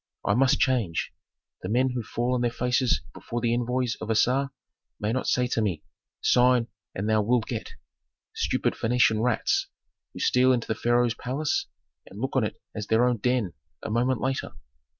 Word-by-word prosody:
I - - +3
must 130 +3 +3
change. 115 -11 0 0.5
The 90 - -5
men 130 +4 +2
who 125 -1 -2
fall 120 +2 -2
on 125 - 0
their 120 - +2
faces 125 +1 +1
before 120 - -5
the 120 0 +1
envoys 125 0 -1
of 110 - -5
Assar 125 +5 +2 0.5
may 105 +2 -1
not 130 - -1
say 125 - +2
to 115 - 0
me, 90 -8 -1 0.4
'Sign 125 -1 +4 0.3
and 100 +3 -2
thou 110 -1 +3
wilt 115 +2 +1
get!' - - -5 0.6
Stupid - - 0
Phœnician 115 -2 +2
rats, 120 -1 +1 0.5
who - - -9
steal 130 +1 +4
into 120 -2 -1
the - - 0
pharaoh's 120 +1 +2
palace 135 +6 -2 0.4
and 100 - -11
look 130 +3 -3
on 130 - +3
it 105 - -4
as 105 -1 -5
their 110 +2 +4
own 125 -1 +2
den 120 -5 0 0.3
a - - -4
moment 120 +1 +1
later!" 130 - -2
120 Hz, 180 wpm, -26 LUFS, 110-125 Hz, 0.6 s, Sign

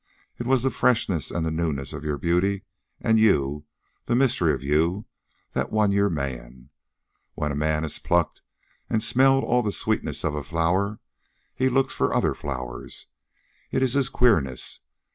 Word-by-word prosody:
It 120 - -4
was 130 -2 +3
the 135 - +1
freshness 110 - +1
and 85 -2 -2
the 80 - -1
newness 80 -5 -2
of - - -6
your 75 -2 -2
beauty 90 +5 +1 0.4
and 110 0 +3
you, 75 -8 +2 0.4
the 120 - +1
mystery 130 0 +3
of - - -3
you, 80 +8 +1 0.5
that - - -1
won 105 -2 +3
your 100 0 +3
man. 65 -5 -5 0.6
When 75 -1 -2
a - - -3
man 75 +1 0
has 80 - -3
plucked 85 -2 0 0.5
and 110 -1 +1
smelled 135 +3 +4
all 125 +1 +2
the 105 -3 -1
sweetness - - -2
of 80 - 0
a 75 -1 -3
flower, 90 +7 0 0.5
he 130 0 +1
looks 135 +1 +1
for - - 0
other - - +2
flowers. 65 -4 -6 0.6
It - - 0
is 125 -2 +1
his 140 -2 +2
queerness. 75 - +1
85 Hz, 165 wpm, -25 LUFS, 75-115 Hz, 0.6 s, smelled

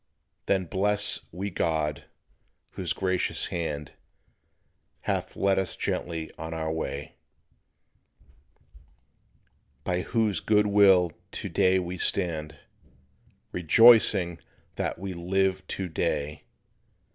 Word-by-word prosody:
Then 95 -2 +1
bless 100 +4 +2
we 95 +4 -4
God, 75 -4 -1 0.7
whose 90 -3 -3
gracious 95 -1 -1
hand 75 -4 -3 1.1
Hath - - -2
led 95 0 +2
us 95 -2 -2
gently 80 -2 -3
on 80 0 -5
our 80 -1 -2
way; 75 -3 -5 2.7
By 90 -1 -1
whose 110 -4 0
good 105 +4 +3
will 95 -4 +5 0.2
to - - -5
day 95 0 +3
we 90 0 -3
stand 80 -5 -1 0.9
Rejoicing 90 -1 +5 0.4
that - - -2
we 95 +1 -5
live 95 +2 0
to 95 - -3
day. 75 -2 -2
90 Hz, 100 wpm, -27 LUFS, 80-95 Hz, 2.7 s, will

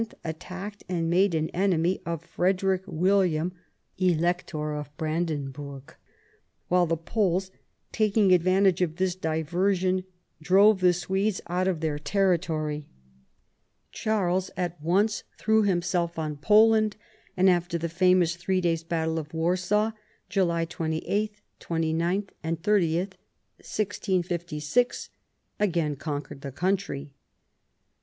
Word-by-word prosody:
attacked 185 +5 -6
and 165 -2 -1
made 185 0 +3
an 160 0 0
enemy 180 -1 +1
of 165 -1 -3
Frederick 185 +2 +1
William, 180 -1 +1 0.5
Elector 170 -3 0
of 150 0 -5
Brandenburg; 145 -4 -4 0.8
while 180 -1 +3
the 165 0 0
Poles, 190 +1 0 0.4
taking 210 -3 +3
advantage 185 +1 +3
of 165 -3 0
this 185 0 0
diversion, 185 +3 0 0.4
drove 195 +5 +5
the 180 -1 +5
Swedes 190 +3 -1
out 180 +2 -1
of 175 -4 -1
their 155 -2 -1
territory. 155 -3 0 1.0
Charles 190 -4 0
at 175 -3 -3
once 195 +7 +1
threw 220 0 +3
himself 175 -3 0
on 155 -2 -2
Poland, 215 +6 +4 0.4
and 185 +1 +4
after 175 -2 +2
the 170 0 -2
famous 175 0 +3
three 185 +2 0
days' 165 -2 0
battle 160 -1 -1
of 150 -1 -8
Warsaw 185 +6 +1 0.4
(July 170 -4 +1
28, 175 +6 -2 0.2
29, 170 +4 -1 0.3
30, 170 -2 +2
1656), 185 0 -2 0.5
again 170 -7 +1
conquered 145 -1 -5
the 140 - -6
country. 165 -3 -2
175 Hz, 110 wpm, -27 LUFS, 160-190 Hz, 1.0 s, drove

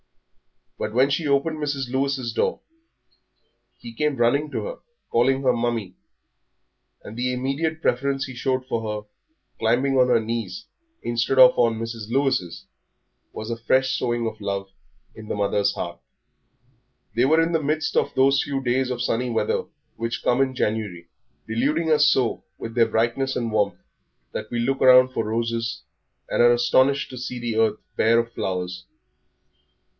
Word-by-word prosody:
But 110 - -4
when 135 +3 +4
she 155 +2 0
opened 145 +3 +1
Mrs. 140 -4 -3
Lewis's 135 -3 -1
door - - 0 1.2
he 115 -1 -10
came 150 +4 0
running 135 +5 +2
to - - -3
her, - - -6 0.3
calling 130 +3 +2
her 130 -1 +4
Mummie; 115 -5 -2 1.1
and 105 - -9
the 125 +1 -1
immediate 140 +6 -2
preference 135 +2 0
he 130 - -8
showed 130 +1 -1
for 115 -3 -2 0.2
her, - - -35 0.5
climbing 120 +5 +2
on 125 - +5
her 120 -2 +4
knees 110 -4 -4 0.4
instead 120 +3 0
of 130 -1 +9
on 115 -2 +2
Mrs. 115 -1 -6
Lewis's, 120 -10 0 0.7
was 110 +2 -6
a 115 - -3
fresh 130 +3 +1
sowing 120 -2 -1
of 110 -1 -5
love 100 -1 -3 0.4
in 110 - -11
the - - -3
mother's 100 0 +1
heart. 85 0 -5 1.2
They 120 +2 +3
were 160 +4 +4
in 165 +1 +2
the 165 -2 +1
midst 155 +2 -1
of - - +1
those 135 +1 +4
few 140 -1 -2
days 130 +1 +1
of 125 -1 -2
sunny 125 +1 0
weather 115 - 0 0.3
which 115 +1 -3
come 125 +2 +2
in 130 -1 0
January, 105 -8 -2 0.4
deluding 145 +9 0
us 150 -1 +5
so 130 -5 +1
with 115 - -7
their 115 -1 +4
brightness 120 +4 0
and 115 -2 -2
warmth 105 -2 +1 0.5
that 110 - -5
we 120 - -3
look 135 +3 0
round 130 0 +7
for 115 - -1
roses 115 +1 -2 0.4
and - - +1
are 120 0 +7
astonished 130 +4 +2
to 130 - -7
see 125 0 -5
the 120 -2 -3
earth 110 -1 +2 0.2
bare 115 +1 +4
of 115 0 0
flowers. 90 -3 -4
120 Hz, 165 wpm, -23 LUFS, 115-135 Hz, 1.2 s, of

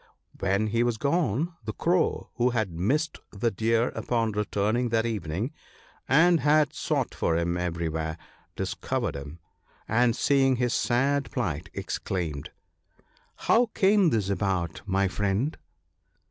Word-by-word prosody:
When 100 +2 +1
he 115 +2 +1
was 120 -2 +1
gone, 150 - 0
the - - -4
Crow, 175 0 0
who 125 +1 +3
had 110 -6 -1
missed 135 - 0
the 115 +3 -1
Deer 115 +3 +1
upon 115 -2 -1
returning 105 +3 0
that 115 0 +1
evening, 105 - -2 0.6
and 165 +5 +5
had 150 +1 +3
sought - - -1
for 80 - 0
him 85 +1 0
everywhere, 80 -2 -2 0.4
discovered - - -2
him; 70 +3 -7 0.5
and 120 +1 +3
seeing 135 -1 +3
his 125 -1 0
sad 140 +3 +1
plight, 95 - -3
exclaimed, 85 -6 -3 0.3
— - - -37
" - - -35
How 240 +1 +5
came 195 -2 +4
this 105 -7 0
about, 95 -4 -1
my 95 0 +2
friend 105 - -1
110 Hz, 135 wpm, -27 LUFS, 95-135 Hz, 0.6 s, and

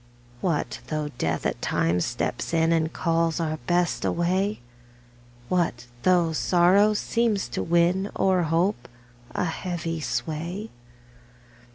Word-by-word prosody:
What 165 -2 -1
though 155 -1 -2
Death - - -1
at - - -1
times 85 +1 +1
steps 120 +6 -2
in, 165 0 +3
And 160 -1 +1
calls 165 -1 0
our 155 -1 -1
Best 175 0 +1
away? 185 +4 0 0.9
What 165 -9 0 0.2
though 175 -1 +3
sorrow 185 +6 +4
seems 225 -2 0
to - - -3
win, 175 +4 +2
O'er 185 -2 +3
hope, 165 -4 0 0.5
a - - +1
heavy 165 -1 -3
sway? 155 - -3
170 Hz, 120 wpm, -25 LUFS, 160-185 Hz, 0.9 s, sorrow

